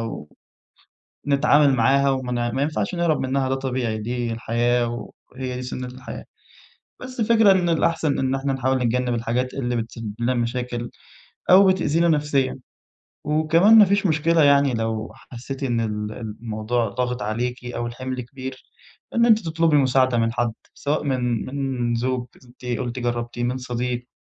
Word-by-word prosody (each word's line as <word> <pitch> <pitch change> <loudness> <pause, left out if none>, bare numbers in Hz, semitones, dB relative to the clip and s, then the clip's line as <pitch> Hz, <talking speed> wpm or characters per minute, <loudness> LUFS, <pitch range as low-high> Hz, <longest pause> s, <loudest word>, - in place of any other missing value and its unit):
و 115 -9 -6 1.0
نتعامل 140 0 +4
معاها 135 +3 +3
وما 125 -2 -1
ما 135 +4 -1
ينفعش 155 +4 -1
نهرب 170 -3 +1
منها 130 0 0
ده 130 - +1
طبيعي 130 -4 -2
دي 120 +1 -3
الحياة 120 +1 -1 0.2
وهي 130 -1 -5
دي 125 - -5
سُنة 125 0 -5
الحياة، 130 +2 -9 0.8
بس 255 0 -9
الفكرة 225 -2 +5
إن 180 -3 +2
الأحسن 165 -2 +1
إن 130 0 0
إحنا 135 0 -1
نحاول 130 0 0
نتجنب 125 0 0
الحاجات 120 +2 -1
اللي 125 -3 -2
بتسبب 115 -2 -5
لنا 120 +2 +1
مشاكل 120 0 -3 0.6
أو 190 +2 +8
بتأذينا 170 -3 +2
نفسيًا، 145 -4 +1 0.7
وكمان 160 +8 +5
ما 210 - +9
فيش 200 +1 +1
مشكلة 160 +1 +2
يعني 140 -2 +4
لو 110 -1 -2
حسيتِ 130 +3 -9
إن 120 -3 0
ال 105 -1 -3
الموضوع 110 +1 -3
ضاغط 125 +1 -2
عليكِ 120 +4 -3
أو 120 -1 -4
الحِمل 130 +2 -5
كبير 130 +1 -8 0.5
إن 235 0 +4
أنتِ 220 -2 +6
تطلبي 160 -1 +2
مساعدة 130 -2 +3
من 115 0 +1
حد، 120 -1 -1 0.2
سواء 150 +1 -2
من 125 -4 -1
من 130 -4 -1
زوج 125 +1 -1 0.2
أنتِ 120 +1 -18 0.2
قلتِ 125 0 -4
جرّبتِه 120 0 -3
من 125 +2 0
صديق 125 0 -3
125 Hz, 155 wpm, -23 LUFS, 120-140 Hz, 1.0 s, ما